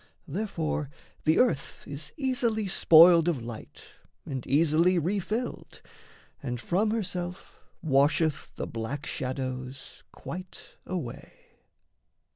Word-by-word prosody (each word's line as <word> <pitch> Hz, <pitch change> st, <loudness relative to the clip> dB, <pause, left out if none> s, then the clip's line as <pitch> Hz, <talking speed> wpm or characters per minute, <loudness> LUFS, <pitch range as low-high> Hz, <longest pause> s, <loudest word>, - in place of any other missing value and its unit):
Therefore 160 Hz, -4 st, -2 dB, 0.4 s
the 155 Hz, 0 st, +4 dB
earth 240 Hz, -, +1 dB
is 145 Hz, +1 st, -7 dB
easily 245 Hz, -6 st, 0 dB
spoiled 170 Hz, -2 st, +7 dB
of 145 Hz, -9 st, 0 dB
light 115 Hz, -1 st, -9 dB, 0.4 s
And 130 Hz, -3 st, -5 dB
easily 165 Hz, +5 st, +4 dB
refilled 205 Hz, +8 st, -2 dB, 0.6 s
and 125 Hz, -3 st, -3 dB
from 190 Hz, -, +1 dB
herself 185 Hz, -4 st, -4 dB, 0.2 s
Washeth 150 Hz, +1 st, +2 dB
the -, -, -3 dB
black 120 Hz, +6 st, -5 dB
shadows 130 Hz, 0 st, -5 dB
quite 180 Hz, +1 st, -9 dB, 0.2 s
away. 170 Hz, -10 st, -5 dB
160 Hz, 95 wpm, -28 LUFS, 135-185 Hz, 0.6 s, spoiled